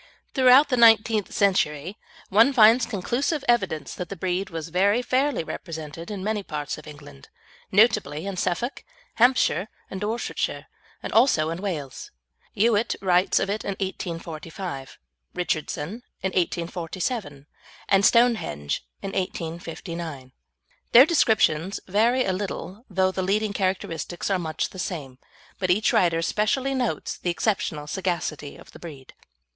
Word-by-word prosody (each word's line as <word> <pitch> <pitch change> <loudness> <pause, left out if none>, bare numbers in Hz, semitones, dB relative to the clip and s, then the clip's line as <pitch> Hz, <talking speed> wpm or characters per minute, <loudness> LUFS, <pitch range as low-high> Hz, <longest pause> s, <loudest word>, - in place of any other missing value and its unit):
Throughout 260 +2 +6
the 250 - +1
nineteenth 225 -2 +5
century, 170 -3 +1 0.3
one 225 +8 +5
finds 230 0 +6
conclusive 245 - -1
evidence 190 -11 0
that 180 - -6
the 200 - -5
breed 185 +1 -2
was 165 -2 -6
very 200 +7 +2
fairly 260 - +1
represented 160 0 -7
in 200 -3 -5
many 215 0 -1
parts 150 -5 -5
of 155 - -14
England, 145 - -13 0.4
notably 190 -7 +3
in 200 -1 -4
Suffolk, 185 +8 -2 0.3
Hampshire, 235 - +3 0.2
and 190 - -5
Dorsetshire, 220 +3 -2 0.4
and - - -5
also 190 - +4
in 165 +2 -5
Wales. 155 -10 -5 0.5
Youatt 220 +1 +2
writes 180 -1 +2
of - - +1
it 205 +2 -2
in 200 - -2
1845, 165 -4 -6 0.4
Richardson 175 +3 -3 0.2
in 190 - +1
1847, 175 - -3 0.4
and 195 0 +4
"Stonehenge" 220 - +2 0.2
in 195 - -3
1859. 165 -5 -5 0.6
Their 250 +3 +10
descriptions 200 - +2
vary 230 +7 +2
a 190 - 0
little, 200 +3 -5
though 190 -1 +2
the 190 - -3
leading 205 +3 0
characteristics 185 -2 -2
are 190 - +2
much 160 -2 -3
the 185 - -10
same, 145 -9 -5 0.4
but 185 - -1
each 205 +5 +3
writer 165 -2 +3
specially 255 +9 0
notes 255 -3 -2
the 180 - -2
exceptional 170 -5 -1
sagacity 160 -4 -3
of - - -15
the - - -13
breed. 145 -6 -11
190 Hz, 135 wpm, -25 LUFS, 165-220 Hz, 0.6 s, Their